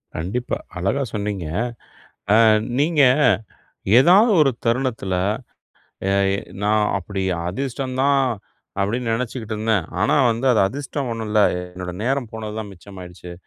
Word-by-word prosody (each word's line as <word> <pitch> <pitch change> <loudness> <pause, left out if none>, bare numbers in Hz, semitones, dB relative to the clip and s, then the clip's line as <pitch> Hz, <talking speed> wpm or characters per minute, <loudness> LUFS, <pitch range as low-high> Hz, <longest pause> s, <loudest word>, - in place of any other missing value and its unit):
கண்டிப்பா. 100 +10 -3 0.2
அழகா 100 +10 0
சொன்னீங்க. 100 -4 -3 0.9
அ - - +6 0.4
நீங்க 150 +1 +3 1.0
ஏதாவது 195 - +6
ஒரு 140 - +3
தருணத்துல 115 -5 0 0.9
அ - - +1 0.3
எ - - -6 0.2
நான் 105 +1 +2
அப்டி 95 +1 -4 0.2
அதிர்ஷ்டம் 130 +5 -4
தான் 140 0 +3 0.6
அப்டின்னு 115 +3 -1
நினைச்சிக்கிட்டுருந்தேன். 110 -4 -2 0.2
ஆனா 105 - +3 0.2
வந்து 115 +4 -2
அது 110 - +3
அதிர்ஷ்டம் 140 0 -4
ஒண்ணும் 115 -1 -5
இல்ல. 105 - +3 0.2
என்னோட 90 0 -7
நேரம் 130 -1 -1
போனதுதான் 110 -1 -6
மிச்சமாயிடுச்சு. 90 -1 -11
110 Hz, 115 wpm, -21 LUFS, 100-130 Hz, 1.0 s, அ